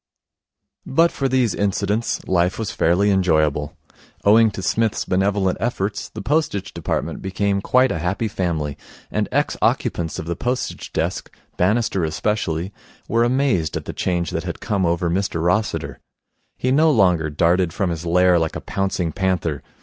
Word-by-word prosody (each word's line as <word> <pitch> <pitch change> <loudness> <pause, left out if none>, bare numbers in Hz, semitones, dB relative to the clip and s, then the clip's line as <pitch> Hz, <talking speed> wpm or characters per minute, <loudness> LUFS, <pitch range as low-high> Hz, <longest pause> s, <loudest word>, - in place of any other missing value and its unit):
But 165 +5 +3
for 135 -1 -1
these 125 -4 +2
incidents 100 +2 -1
life 90 0 +1
was 110 -3 -3
fairly 95 +5 +2
enjoyable. 80 -6 +1 0.5
Owing 110 +2 +6
to 95 -2 -7
Psmith's 110 +3 0
benevolent 95 0 +1
efforts, 105 -4 -2
the 105 - -8
Postage 120 -8 -1
Department - - -3
became 100 +1 -1
quite 130 +5 +3
a 80 - -2
happy 90 +7 -1
family, 85 -8 -2 0.3
and - - -1
ex - - 0
occupants 80 -2 0
of - - -5
the 85 +1 -3
postage 125 +7 -3
desk, - - -2 0.3
Bannister 100 0 +1
especially, 85 +1 -1 0.3
were 115 +1 +2
amazed 120 - +1
at - - -7
the - - -5
change 85 -3 -1
that - - -2
had - - -5
come 95 -4 0
over 85 +1 0
Mr 90 0 -1
Rossiter. 90 +6 -1 0.6
He 130 - 0
no 155 +4 +4
longer 90 - +3
darted 85 +3 +2
from 90 +1 -1
his 85 0 -4
lair 90 +1 +4
like 80 -1 -2
a - - -4
pouncing 95 -4 -2
panther. 90 -5 -1
95 Hz, 155 wpm, -21 LUFS, 85-110 Hz, 0.6 s, Owing